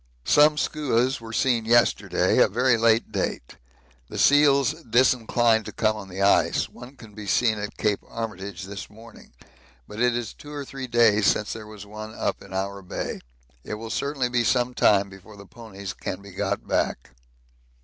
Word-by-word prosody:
Some 150 +1 +5
skuas 130 -5 0
were 115 0 -9
seen 115 -1 +1
yesterday, 120 +1 +2
a - - +6
very 125 +4 +2
late 115 0 +2
date. - - -4 0.5
The - - -7
seals 140 -1 +4
disinclined 120 -3 +2
to - - -6
come 110 -1 0
on 100 -2 -9
the 95 +2 -3
ice; 100 - +3
one 125 +3 -13
can 110 -5 -14
be 105 -1 -9
seen 110 +1 +2
at 105 0 -6
Cape 105 -2 0
Armitage 100 -5 -6
this 100 +1 -8
morning, 115 +2 -15 0.6
but 105 - -9
it 120 0 +2
is 120 -3 -5
two 145 - -13
or 145 -1 -5
three 135 -1 -7
days 110 -4 +4
since 105 - +1
there 110 -1 -9
was 105 -1 -10
one 110 +1 -9
up - - -2
in - - -14
our 100 +1 -3
Bay. 90 - -5 0.4
It - - -5
will 110 +1 -7
certainly 140 -3 -1
be 120 -1 +1
some 125 +1 +1
time 100 -4 +3
before 95 +2 -14
the 100 - -12
ponies 100 -3 -9
can 95 +1 -6
be 100 - -12
got 90 - -3
back. - - -1
115 Hz, 180 wpm, -24 LUFS, 100-125 Hz, 0.6 s, a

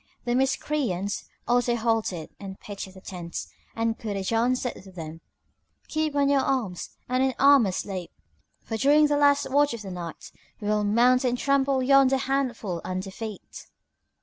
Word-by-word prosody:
The 240 - 0
Miscreants 250 -7 0 0.2
also 240 0 +2
halted 220 -8 -1
and 195 -1 -8
pitched 200 -2 -7
their 190 0 -14
tents, 175 -3 -6 0.2
and 225 0 -1
Kurajan 225 +4 0
said 245 -6 -4
to 190 - -13
them 165 -2 -8 0.7
"Keep 310 -1 -1
on 285 -1 +3
your 280 -1 +4
arms, 230 -11 -1 0.2
and 255 +1 +1
in 265 -1 +1
armour 275 -8 +6
sleep, 185 -2 -4 0.5
for 225 - -4
during 290 +5 +5
the 295 0 +2
last 285 0 +4
watch 285 -2 +3
of 220 - -8
the 195 - -7
night 170 -3 -7 0.3
we 210 - -3
will 210 0 +2
mount 240 +5 +4
and 245 -1 +1
trample 275 -1 +2
yonder 270 0 +5
handful 250 -10 -2
under 185 +1 -4
feet!" 215 0 -8
235 Hz, 160 wpm, -26 LUFS, 195-270 Hz, 0.7 s, armour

